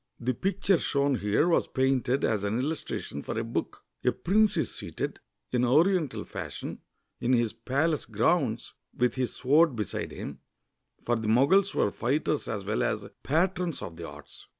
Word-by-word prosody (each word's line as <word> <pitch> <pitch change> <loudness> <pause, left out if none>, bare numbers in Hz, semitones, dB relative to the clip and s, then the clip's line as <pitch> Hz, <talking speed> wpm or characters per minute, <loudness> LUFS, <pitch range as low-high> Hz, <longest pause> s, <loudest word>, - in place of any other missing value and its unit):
The 125 +2 0
picture 195 +3 +1
shown 140 -2 +1
here 105 - +2
was 170 - +3
painted 130 0 +1
as 110 -3 +1
an 100 +2 0
illustration 135 - -3
for - - -4
a 115 - 0
book. 115 - -4 0.2
A - - +4
prince 210 +3 +2
is - - 0
seated, - - -4 0.3
in 125 0 +1
Oriental 155 +4 +2
fashion, - - -6 0.4
in 125 - +1
his 120 -3 +2
palace 140 +7 0
grounds, 115 - +1 0.2
with 125 -1 +2
his 130 -2 -2
sword 145 +2 +4
beside 105 -4 -3
him, - - -7 0.7
for 120 - +2
the 110 -1 -3
Moguls 170 - +4
were 100 - +2
fighters 145 +4 -1
as 100 -3 -3
well 105 +2 0
as - - -1
patrons 175 +2 0
of 85 - -7
the 85 0 -7
arts. - - -13
130 Hz, 165 wpm, -28 LUFS, 115-160 Hz, 0.7 s, A